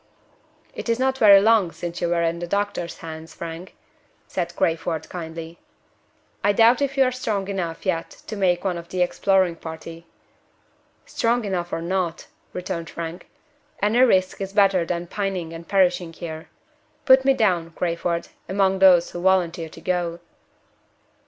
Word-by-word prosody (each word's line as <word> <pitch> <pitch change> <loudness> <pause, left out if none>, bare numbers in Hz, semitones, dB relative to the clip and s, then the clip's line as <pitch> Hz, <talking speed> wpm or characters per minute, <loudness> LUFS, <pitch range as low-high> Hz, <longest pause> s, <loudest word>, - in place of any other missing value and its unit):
"It - - -6
is 230 - +2
not 265 +1 0
very 200 -2 +8
long 210 -4 +3
since 175 0 -6
you 175 - 0
were 170 0 +1
in 170 0 0
the 175 - -4
doctor's 200 -3 -2
hands, 160 0 -9
Frank," 170 +2 -8 0.5
said - - -4
Crayford, 165 -1 -1
kindly. 165 -1 -7 0.8
"I 205 +1 +4
doubt 230 +5 +5
if 275 0 -1
you 270 - +6
are 255 - +1
strong 215 -6 -2
enough 180 -4 -4
yet 170 -3 -1 0.2
to 215 - -6
make 180 -3 +1
one 180 -3 -1
of 170 0 -12
the 180 -1 +1
exploring 185 -1 +1
party." 165 +1 -9 1.0
"Strong 235 0 0
enough 180 -3 -2
or 165 - -3
not," 175 -1 -2 0.3
returned 180 -2 -5
Frank, 170 +1 -7 0.5
"any 210 +4 +2
risk 190 -7 +3
is 195 0 -4
better 195 -4 +4
than 175 0 -2
pining 185 -3 -3
and 165 0 -9
perishing 180 -3 +2
here. 160 -2 -8 0.6
Put 260 0 +7
me 270 0 +4
down, 180 -9 +1
Crayford, 170 0 -2 0.2
among 190 0 +2
those 180 -3 +6
who 175 - -6
volunteer 175 -3 +1
to 165 - -13
go." 175 -1 -1
180 Hz, 160 wpm, -23 LUFS, 170-200 Hz, 1.0 s, very